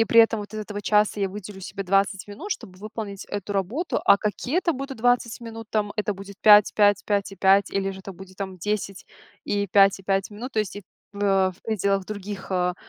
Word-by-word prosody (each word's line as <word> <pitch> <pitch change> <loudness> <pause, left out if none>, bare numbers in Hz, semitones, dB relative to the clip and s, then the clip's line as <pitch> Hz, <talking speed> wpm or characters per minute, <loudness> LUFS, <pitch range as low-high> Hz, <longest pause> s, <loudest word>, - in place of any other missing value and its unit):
и - - +5
при 230 0 +6
этом 225 -1 +3
вот 205 +1 -9
из 215 - -3
этого 205 -1 -5
часа 210 0 +2
я 195 - +1
выделю 200 0 -9
себе 195 +2 -6
20 195 +1 +1
минут, 205 - -8
чтобы 185 -6 -10
выполнить 210 -1 -6
эту 205 0 -4
работу". 220 - -1
А 200 - +7
какие 245 - -1
это 345 -2 +1
будут 270 -1 -6
20 245 0 +1
минут? 225 -1 -8
Там 210 -1 0
это 210 -1 -1
будет 195 +1 -10
5, 210 -1 +7
5, 205 -1 +4
5 200 -1 0
и 195 - -11
5, 195 +1 +4
или 195 0 -1
же 190 0 -8
это 195 - -8
будет 185 +1 -13
там 190 -2 -5
10 200 0 -3 0.4
и 200 0 -1
5 195 +1 +5
и 195 - -14
5 195 +1 0
минут. 240 +5 -7
То 220 - -1
есть 205 -1 -4
и 205 - -7 0.3
в 200 - -9
вя 195 -2 +3
в 180 - -24
пределах 200 -3 0
других, 200 -1 -6
а, 180 -1 +1
205 Hz, 235 wpm, -24 LUFS, 195-215 Hz, 0.4 s, А